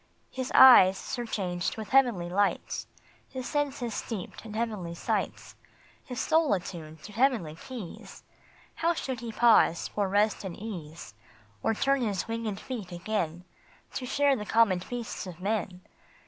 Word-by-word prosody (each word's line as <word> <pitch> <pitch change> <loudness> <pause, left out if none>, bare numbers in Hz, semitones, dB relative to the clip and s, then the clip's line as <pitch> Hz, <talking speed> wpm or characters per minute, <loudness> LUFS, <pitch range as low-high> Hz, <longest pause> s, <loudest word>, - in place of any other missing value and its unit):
His 260 -1 -4
eyes 195 -8 +9
surcharged 195 -9 -3
with 220 -1 -6
heavenly 240 -10 +3
lights, 195 +3 -1 0.4
His 260 -1 -6
senses 275 -5 -2
steeped 205 -5 -6
in 215 -2 -8
heavenly 210 -7 -3
sights, - - -3 0.5
His 250 - -6
soul 320 -8 +3
attuned 160 -4 -8
to 210 - -9
heavenly 230 - +1
keys, 210 +2 -9 0.5
How 335 +1 +1
should 260 -5 -4
he 235 -1 -6
pause 220 -7 +4
for 205 -2 -1
rest 205 +2 +2
and 190 -3 -6
ease, 170 - -8 0.5
Or 225 - +1
turn 275 +4 +2
his 205 -5 -1
winged 225 -3 -3
feet 215 -8 -6
again, 175 -2 -3 0.5
To 255 - -4
share 285 +1 +3
the 210 - -4
common 210 -4 +3
feasts 235 +1 -6
of 175 -2 -9
men 190 -2 -2
215 Hz, 145 wpm, -28 LUFS, 180-245 Hz, 0.5 s, eyes